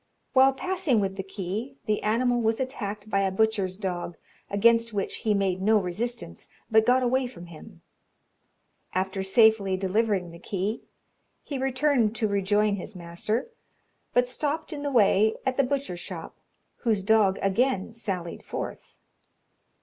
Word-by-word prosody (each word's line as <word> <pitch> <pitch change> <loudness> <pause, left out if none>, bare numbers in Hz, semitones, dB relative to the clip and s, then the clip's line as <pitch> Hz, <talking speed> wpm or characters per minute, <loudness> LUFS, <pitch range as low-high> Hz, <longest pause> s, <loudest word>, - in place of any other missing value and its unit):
While 265 0 +6
passing 350 - 0
with 195 -1 -1
the 195 - -3
key, 195 +6 -5
the 215 -1 0
animal 240 +3 +1
was 225 0 +1
attacked 215 -6 -4
by 200 -2 +1
a 195 -1 +2
butcher's 195 -2 0
dog, 180 -4 -4 0.3
against 230 +2 +3
which 200 -2 -2
he 215 -2 +1
made 190 -2 0
no 215 +3 +4
resistance, 205 - -3 0.2
but 220 0 +5
got 255 +1 +4
away 255 +1 +1
from 210 -8 -11
him. 170 -3 -13 1.1
After 190 +1 -1
safely 200 -1 +4
delivering 195 -2 0
the 170 - -12
key, 200 +4 -3 0.6
he 280 -3 -4
returned 260 -4 +2
to 220 -1 0
rejoin 200 +1 +1
his 190 +2 -8
master, 180 - -3 0.6
but 245 0 +3
stopped 300 +5 -3
in 290 - -5
the 285 - -1
way 220 -3 +4
at 260 -1 0
the 275 - +4
butcher's 270 -9 -2
shop, - - -7 0.4
whose 220 -5 0
dog 205 -2 +4
again 210 +1 +1
sallied 190 -7 -4
forth. - - -7
215 Hz, 150 wpm, -26 LUFS, 190-245 Hz, 1.1 s, While